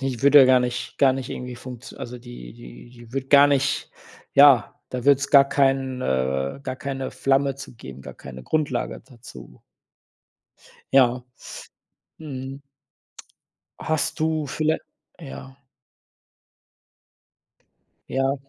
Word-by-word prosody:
die 135 -3 -3
würde 140 +1 +7
ja - - +8
gar 130 -1 +5
nicht 125 0 -4
gar 135 -2 +5
nicht 130 -1 -5
irgendwie 125 -1 -6
funktio 125 0 -10
also 125 +1 -7
die 120 - -11
die - - -13
die 120 -1 -16
würde 135 -1 -3
gar 140 +1 +7
nicht 140 -1 0 0.4
ja, 140 -6 +6
da 125 -1 -5
würde 140 -1 +5
es 140 0 -4
gar 140 -1 +7
keinen 135 -2 +1
äh, 65 - -1
gar 130 - -5
keine 135 -1 -5
Flamme 135 0 +1
zu 135 -2 -10
geben 65 - -11
gar - - -10
keine 65 0 -11
Grundlage 155 - -2
dazu. 120 - -14 1.3
Ja, 125 -2 +4 0.9
mhm. 135 -2 -7 1.2
Hast 160 +1 -2
du 155 -1 0
viellei 155 +3 0 0.4
ja? 135 -3 -10 2.5
Ja. 135 +1 0
130 Hz, 125 wpm, -23 LUFS, 120-140 Hz, 2.5 s, ja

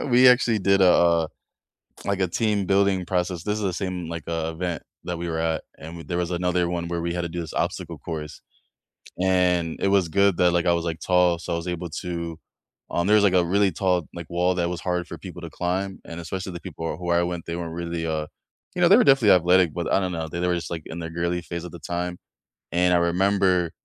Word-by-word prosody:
we 125 -1 +6
actually 125 -3 +4
did 100 +1 +3
a, - - +7
uh 85 -2 +4 0.8
like 100 -1 -1
a 95 - +2
team 105 +1 0
building 95 -1 +2
process 90 -2 -1
this 105 +1 -1
is - - -4
the 95 -2 0
same, 90 -2 -3
like, 85 -2 -5
uh, 80 -1 -2
event 85 -1 -3 0.2
that 90 -1 -4
we 85 +1 -4
were 80 0 -2
at, 80 -1 -1 0.2
and 80 +2 -8
we 85 - -9
there 85 - -3
was 90 -1 -1
another 90 0 0
one 85 -1 -2
where 85 0 -2
we 85 0 -2
had 90 - -1
to 85 - -4
do 85 - -5
this 80 - -7
obstacle - - -2
course, 75 -3 -7 0.8
and 90 -3 +2
it - - +1
was 95 -3 +3
good 100 +1 +3
that, 90 -1 +4
like 85 0 +1
I 85 - +4
was, 85 0 -1
like, 80 -1 -3
tall, 90 -2 +3
so, 85 +1 -5
I - - 0
was 85 +1 -5
able 90 0 -3
to, 85 -3 -5 0.5
um 85 - 0
there's, 105 0 +5
like, 100 -2 +4
a 90 -2 +4
really 100 +2 +2
tall, 90 -1 0
like, 85 -2 -8
wall 90 +1 +1
that 85 -1 0
was 85 -1 -4
hard 90 -1 -2
for - - -7
people 90 -2 -9
to 85 - -7
climb, 95 +4 -2
and 85 - -7
especially 95 +2 -5
the 85 - -7
people 80 -3 -5
who 90 0 -3
I 85 0 +4
went 85 -1 -4
they 85 - -4
weren't 85 -1 -5
really, 85 -1 -3
uh, 80 -1 -1 0.5
you 180 - -2
know 175 - +6
they 200 - +8
were 250 - +5
definitely 135 - +6
athletic, 90 -2 +4
but 85 -2 -2
I - - +5
don't 95 -2 -2
know, 80 -2 -3
they 85 - -5
they 90 - 0
were 90 - +2
just 85 -2 -4
like 80 -2 -4
in 85 - -7
their 80 -1 -5
girly 85 +1 -1
phase 85 0 -6
at 90 - -8
the 85 - -10
time, 90 +2 -3 0.5
and 90 +1 +3
I - - +5
remember, 90 0 +2
90 Hz, 255 wpm, -24 LUFS, 85-95 Hz, 0.8 s, they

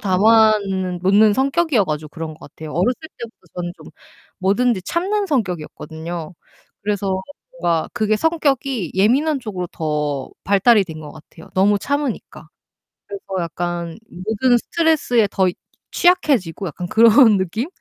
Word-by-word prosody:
담아 215 +3 +4
는 185 -2 -3
놓는 205 +3 +5
성격이어 275 - +2
가지고 155 -2 -4
그런 160 0 -7
것 - - -22
같아요. 155 -1 -10
어렸을 230 +9 0 0.2
때부터 235 -1 -8 0.2
저는 175 -1 -4
좀 - - -15 0.5
뭐든지 200 +2 +1
참는 395 - -1
성격이었거든요. 170 - -4 0.5
그래서 200 -2 -1 0.4
뭔가 165 -2 0
그게 215 0 +1
성격이 275 - 0
예민한 270 +11 +2
쪽으로 190 -6 -5
더 150 -5 -3
발달이 200 +1 +4
된 160 -3 -9
것 150 -1 -10
같아요, 160 +1 -15
너무 200 +2 +3
참으니까. 285 -2 -4 0.6
그래서 200 -1 -8 0.2
약간 170 0 -4
모든 220 +7 +1
스트레스에 290 -8 +1
더 190 -2 +2 0.4
취약해지고 275 - +1
약간 175 +2 -5
그런 225 0 +6
느낌? 190 +7 -2
200 Hz, 315 characters per minute, -20 LUFS, 175-245 Hz, 0.6 s, 그런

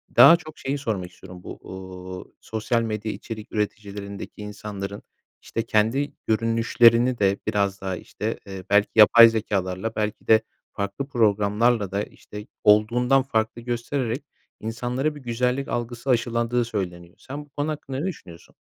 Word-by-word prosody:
daha 165 - +10
çok 155 -3 -12
şeyi 135 +2 -2
sormak 100 -10 -3
istiyorum. 90 0 -13
Bu, - - -8
uuu, 95 -1 -9
sosyal 110 +1 -1
medya 110 -1 -3
içerik 110 +1 -8
üreticilerindeki 100 -1 -5
insanların, 100 -1 -6 0.4
işte, 115 - -3
kendi 115 +6 +1
görünüşlerini 115 +2 +4
de 100 0 +3
biraz 100 -1 0
daha, 95 -1 -2
işte, 110 +4 -5
eee, 95 -1 -7
belki 100 0 +4
yapay 115 +2 +9
zekâlarla 105 -1 -2
belki 105 -1 -3
de 110 -1 +6 0.3
farklı 100 +7 -4
programlarla 105 -2 +2
da, 100 +1 -1
işte, 105 0 -11 0.2
olduğundan 120 +6 +4
farklı 110 -2 -1
göstererek 120 +2 -2 0.4
insanlara 125 +6 -2
bir 145 - -10
güzellik 125 +3 -1
algısı 120 +2 -4
aşılandığı 120 0 +1
söyleniyor. 90 -6 -5
Sen 145 +2 -8
bu - - -29
konu 145 +3 -2
hakkında 135 -3 -5
ne 155 - -2
düşünüyorsun? 90 - -8
110 Hz, 140 wpm, -24 LUFS, 100-120 Hz, 0.4 s, daha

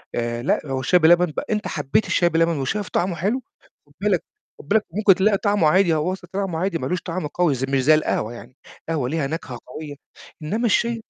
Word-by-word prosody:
آآ، 120 0 -2
لأ، 135 - +1
هو 135 -2 -2
الشاي 175 +8 +3
بلبن 175 +2 +5
بق 155 -5 -5
أنت 210 0 -1
حبّيت 145 +7 0
الشاي 175 - +2
بلبن 165 -1 +1
وشايف 185 +10 -2
طعمه 180 0 0
حلو 205 +11 -1 0.5
خُد 145 - -25
بالك 200 -4 +1 0.4
خُد 145 - -13
بالك 215 +3 +2
ممكن 200 0 +4
تلاقي 200 +2 +3
طعمه 205 -6 +2
عادي 180 +1 +4
هو 160 +4 0
أصلًا 180 -2 -10
طعمه 190 -4 -2
عادي 185 -2 0
ما 130 - -4
لوش 180 - -2
طعم 170 -3 -4
قوي 160 -2 +1
ز 130 - -4
مش 135 -1 0
زي 155 +4 +6
القهوة 120 -7 -1
يعني، 125 +2 -12 0.3
القهوة 145 -6 -1
ليها 155 -3 -1
نَكهة 140 -5 -6
قوية 145 +2 -8 0.5
إنّما 220 +10 -1
الشاي 230 +1 +1
165 Hz, 215 wpm, -22 LUFS, 145-195 Hz, 0.5 s, زي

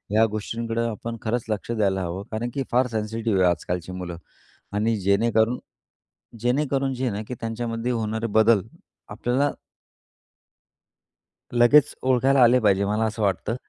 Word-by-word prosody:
या 110 +1 +6
गोष्टींकडं 115 +2 -2
आपण 115 +2 -5
खरंच 115 +1 -2
लक्ष 110 +2 -3
द्यायला 100 -4 +1
हवं. 90 +3 -4
कारण 115 +2 -2
की 135 - -1
फार 125 +1 +3
सेन्सिटिव्ह 110 -2 -1
आहे 90 - +5
आजकालची 90 +2 -4
मुलं 90 -2 -6 0.6
आणि 110 +2 +1
जेणेकरून 110 +4 +2 0.8
जेणेकरून 135 +2 0
जे 130 - -4
आहे - - 0
ना, 105 - -3
की - - -5
त्यांच्यामध्ये 115 +1 -3
होणारे 110 0 -2
बदल 110 -1 +4 0.5
आपल्याला 135 +4 0 2.0
लगेच 130 +5 +5
ओळखायला 130 +1 +3
आले 125 +2 +6
पाहिजे 100 -2 +2
मला 105 +2 0
असं 110 0 -3
वाटतं. 100 +3 0
115 Hz, 140 wpm, -24 LUFS, 105-120 Hz, 2.0 s, या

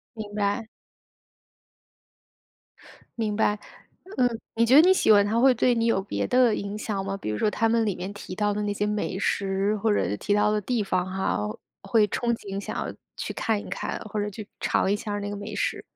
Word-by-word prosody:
明 210 -2 -7
白。 205 +2 0 2.5
明 215 -2 0
白， 210 -1 +1 0.6
嗯。 245 -2 +2 0.2
你 230 +1 +4
觉 255 - +5
得 295 - +10
你 370 +2 +6
喜 370 - +2
欢 205 -1 +6
它 220 +3 0
会 260 0 +6
对 245 +1 +3
你 230 0 +1
有 210 -4 +2
别 200 - -2
的 250 -3 +4
影 200 0 -4
响 210 -2 -3
吗？ 195 0 -2
比 180 - -5
如 105 - -2
说 215 - +2
它 225 - +1
们 230 -1 +2
里 200 - 0
面 190 +3 -5
提 200 -2 -8
到 205 +2 +1
的 210 - -2
那 205 0 -1
些 205 - -1
美 210 -2 -1
食， 195 +1 0
或 215 +1 +1
者 105 - 0
提 205 - 0
到 210 +1 +3
的 210 0 +1
地 235 +2 -1
方 180 -2 0
哈， 185 - -1 0.4
会 210 +2 +3
憧 240 +4 -1
憬 195 -3 -6
想 - - -6
要 - - -3 0.2
去 - - -4
看 220 -2 0
一 - - -8
看， - - -3
或 215 -1 -4
者 205 - -1
去 210 +1 -8
尝 - - +1
一 - - +2
下 210 -1 -5
儿 205 - -2
那 205 0 -4
个 205 - -4
美 205 +2 -6
食。 - - -1
210 Hz, 235 characters per minute, -26 LUFS, 200-225 Hz, 2.5 s, 得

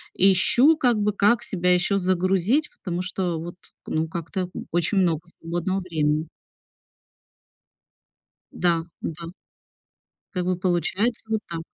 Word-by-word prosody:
ищу, 200 - +5
как 245 -6 +3
бы, 210 0 +1
как 205 +3 +3
себя 180 -1 +1
ещё 180 +3 +2
загрузить, 185 - +1
потому 175 -1 -2
что 180 -2 -2
вот, 170 +1 -7 0.3
ну, 160 +1 0
как-то 170 +3 -4
н - - -6
очень 175 +4 +1
много 170 -4 +2 0.2
свободного 175 +3 -2
времени. 155 -3 0 2.2
Да. 170 -2 +1 0.2
Да. 165 +1 -5 1.1
Как 180 -2 -2
бы 185 0 +1
получается 185 +6 0
вот 220 0 +1
так. 165 -1 -5
180 Hz, 125 wpm, -24 LUFS, 170-195 Hz, 2.2 s, ищу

